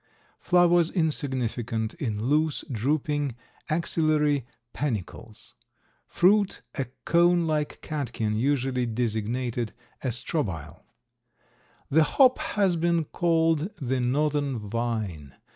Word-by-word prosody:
Flowers 175 -2 +4
insignificant 125 - -1
in 110 -10 -3
loose, 150 +2 +1
drooping 145 +2 -1 0.3
axillary 155 -4 +1 0.3
panicles. 115 -4 -5 0.5
Fruit 200 +2 +2
a 135 - -2 0.2
cone 175 0 +4
like 155 -2 -2
catkin 120 -8 -2
usually 130 0 0
designated 115 +1 -2 0.3
a - - -1
strobile. 110 - -3 1.1
The 160 +3 +5
hop 260 0 +6 0.2
has 190 -4 +3
been 170 0 +2
called 165 +1 +1
the 130 -1 -2
northern 140 +1 0
vine. 105 - -3
140 Hz, 95 wpm, -26 LUFS, 115-160 Hz, 1.1 s, hop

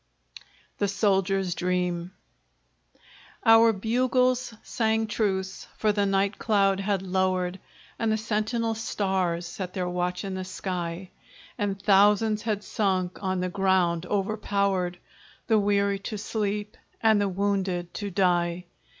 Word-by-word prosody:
THE 205 - +2
SOLDIER'S 195 -2 +1
DREAM 180 -1 -1 1.3
Our 225 0 +7
bugles 250 +4 +1
sang 220 -1 0
truce 195 -3 -2
for 215 - +2
the 205 -1 +1
night 195 +1 +1
cloud 195 -3 +2
had 195 -1 -1
lowered, 185 -1 0 0.4
And 225 -1 +1
the 220 - +2
sentinel 220 +1 -1
stars 190 -6 -1
set 180 +1 -6
their 180 -2 -1
watch 180 +1 -2
in 195 - -4
the 185 0 -3
sky; 180 -1 -5 0.4
And 200 -3 -2
thousands 210 +2 +4
had 210 -3 -2
sunk 185 -4 -1
on 185 -2 -1
the 185 - -1
ground 180 -2 +1
overpowered, 200 -3 0 0.5
The 220 -2 +3
weary 200 -1 +1
to 210 +2 -5
sleep, 210 0 -3 0.2
and 220 -2 +4
the 200 - +1
wounded 190 -2 -1
to 205 -1 -4
die. 175 -2 +1
195 Hz, 125 wpm, -26 LUFS, 185-210 Hz, 1.3 s, Our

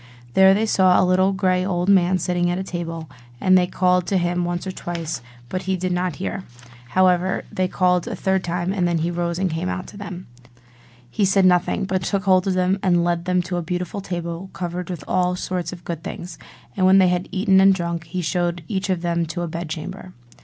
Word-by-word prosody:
There 190 0 +6
they 215 +2 +1
saw 185 -4 +4
a - - +4
little 185 +1 +3
grey 185 -1 +1
old 180 -1 -1
man 185 -2 +4
sitting 175 0 0
at 175 - -1
a 190 - -2
table; 165 -3 -5 0.3
and 185 0 +4
they 180 -1 +4
called 180 -1 +1
to 195 - +1
him 175 0 0
once 175 +1 -3
or 190 - -3
twice, 170 -4 -5 0.3
but 185 +8 -3
he 190 - +1
did 185 0 -2
not 180 -2 -1
hear: 190 +1 -4 0.5
however, 185 0 +3
they 185 0 0
called 180 -1 +1
a - - -3
third 190 -1 0
time, 175 +2 -2
and 180 -3 +1
then 170 -1 +1
he 165 +2 -1
rose 170 0 -2
and 185 -1 0
came 165 +3 -2
out 185 - -4
to 205 - -12
them. 200 -3 -7 0.8
He 120 - -2
said 195 0 +4
nothing, 180 +2 +2
but 185 0 -1
took 195 +2 -1
hold 185 -1 +3
of 190 - +1
them 185 +2 +1
and 175 -2 +3
led 170 0 0
them 180 -1 +1
to 175 0 -3
a - - -1
beautiful 180 +3 -4
table 175 0 -5
covered 175 0 -4
with 170 -5 -5
all 180 0 +1
sorts 180 -1 -3
of 175 -1 -10
good 170 -2 -4
things: 175 -2 -7 0.4
and 185 -1 +3
when 190 +1 +6
they 185 -2 +5
had 180 0 -1
eaten 190 -1 +3
and 195 0 +7
drunk, 170 -2 -3
he 180 +2 -4
showed 175 +1 -1
each 195 +1 -2
of 180 -2 -1
them 170 -1 0
to 175 +2 -4
a - - -2
bed 165 0 -5
chamber. 180 +3 -7
180 Hz, 230 wpm, -22 LUFS, 175-185 Hz, 0.8 s, and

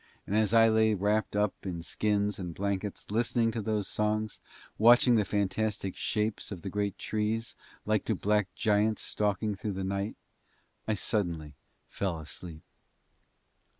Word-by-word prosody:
And 100 - -2
as 110 -2 +3
I 115 0 +7
lay 110 -1 +4
wrapped 105 +2 0
up 105 -1 +2
in 90 -4 -5
skins 105 +1 0
and 90 -3 -5
blankets 100 0 -3
listening 115 +1 +2
to 115 0 -3
those 105 -2 -1
songs, 105 0 -1
and - - -21
watching 120 +2 +7
the 110 -3 +4
fantastic 100 0 -1
shapes 105 0 -1
of 95 -4 -7
the 95 - -4
great 100 -1 -1
trees 110 +2 -2 0.3
like 105 -1 +1
to 110 - +1
black 105 +1 +1
giants 110 0 +2
stalking 105 0 0
through 105 +1 -4
the 95 0 -3
night, 100 +2 -2 0.7
I 110 - +1
suddenly 85 -8 -1 0.3
fell 95 -4 -2
asleep. 80 +1 -7
105 Hz, 150 wpm, -30 LUFS, 95-110 Hz, 0.7 s, I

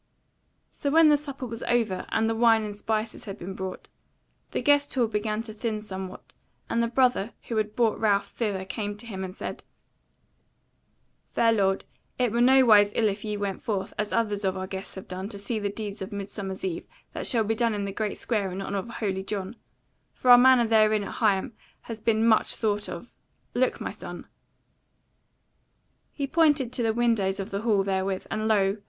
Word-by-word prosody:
So 285 - -3
when 320 +1 +6
the 300 - +6
supper 280 -3 -5
was 230 -1 -6
over, 225 -6 0
and 225 0 +1
the 225 - +1
wine 225 -1 +4
and 210 -1 -5
spices 215 +2 -3
had 200 -1 -6
been 190 +1 -6
brought, 190 -1 -6 0.6
the - - -2
Guest 290 -1 +3
hall 250 -3 +3
began 215 0 -2
to 220 -2 -8
thin 215 0 -2
somewhat, 190 -3 -8 0.4
and 235 - +2
the 235 - +2
brother 245 -3 +2
who 230 - -2
had 215 -1 -1
brought 230 -3 +2
Ralph 205 -2 +2
thither 200 -5 -2
came 205 +2 -4
to 235 - -13
him 190 -4 -5
and 185 0 -6
said: - - -6 1.6
"Fair 230 -1 +3
lord, 195 -3 +1 0.3
it 245 -3 +1
were 235 +2 +1
nowise 240 -5 +6
ill 220 -2 +3
if 200 +1 -5
ye 210 -1 -3
went 200 -2 -3
forth, 200 -5 -3
as 210 0 -1
others 210 -3 0
of 190 -1 0
our 185 - -3
guests 190 0 -7
have 190 - -9
done, 185 +2 -5
to 205 - -7
see 210 +3 -3
the 205 -1 -1
deeds 205 0 -6
of 190 - -5
Midsummer 200 -1 -5
Eve 185 -3 -3 0.3
that - - -3
shall 230 -3 +3
be 220 +1 0
done 230 -1 +1
in 200 -1 -2
the 200 - -3
great 210 +1 -3
square 205 -5 -1
in 185 - -5
honour 195 +1 -2
of 215 - -7
Holy 195 -5 -2
John; 195 +1 -4 0.6
for 250 - +3
our 245 - +11
manner 255 -1 +6
therein 215 -1 +4
at - - -6
Higham 215 +1 +2 0.3
has 230 -1 -7
been 220 0 +2
much 220 -1 +3
thought 210 -2 -1
of. - - -8 0.4
Look 255 +1 +1
my - - -4
son!" - - -9 1.9
He 280 - -3
pointed 295 -4 +2
to 250 - -1
the 225 -1 +2
windows 220 -5 +1
of 195 - -5
the 200 +1 -2
hall 215 -4 +2
therewith, 190 -1 -1
and 215 0 -1
lo! 200 -2 +2
215 Hz, 200 wpm, -26 LUFS, 195-235 Hz, 1.9 s, our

